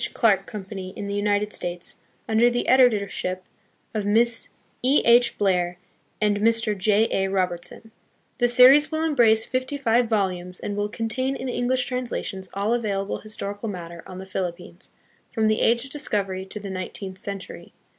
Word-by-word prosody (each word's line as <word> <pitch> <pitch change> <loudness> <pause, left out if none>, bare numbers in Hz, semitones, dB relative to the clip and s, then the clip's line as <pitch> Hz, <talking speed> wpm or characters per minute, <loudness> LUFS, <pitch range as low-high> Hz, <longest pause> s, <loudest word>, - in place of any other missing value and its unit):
Clark 200 -5 +3
Company 190 -2 -7
in 205 - -4
the 200 - -4
United 205 0 0
States, 175 0 -5 0.3
under 225 +2 +4
the 245 0 -2
editorship 205 -7 +2 0.5
of 215 -2 -1
Miss 225 +3 +2 0.3
E. 265 +4 +3
H. 240 +1 +5
Blair 180 -3 +1 0.4
and 210 -1 +2
Mr. 225 0 +2
J. 210 +2 +3
A. 195 0 0
Robertson. 185 +3 -2 0.5
The 245 - +4
series 255 +5 +7
will 315 0 -1
embrace 235 -8 +3
fifty 260 +2 -2
five 235 -3 +2
volumes, 180 -4 -1
and 205 - -4
will 205 0 -1
contain 245 +5 -2
in 265 - -5
English 250 +1 0
translations 235 -7 -4
all 205 +3 0
available 205 -4 -2
historical 215 0 -5
material 170 -3 -7
on 185 - -9
the 190 - -7
Philip 185 -2 -3
pines, 175 0 -12 0.4
from 220 -2 0
the 215 0 +2
age 235 +1 +3
of 270 - -10
discovery 195 -10 -2
to 210 - -6
the 200 -1 -7
nineteenth 190 +1 -6
century. 200 -1 -7
210 Hz, 165 wpm, -24 LUFS, 190-240 Hz, 0.5 s, series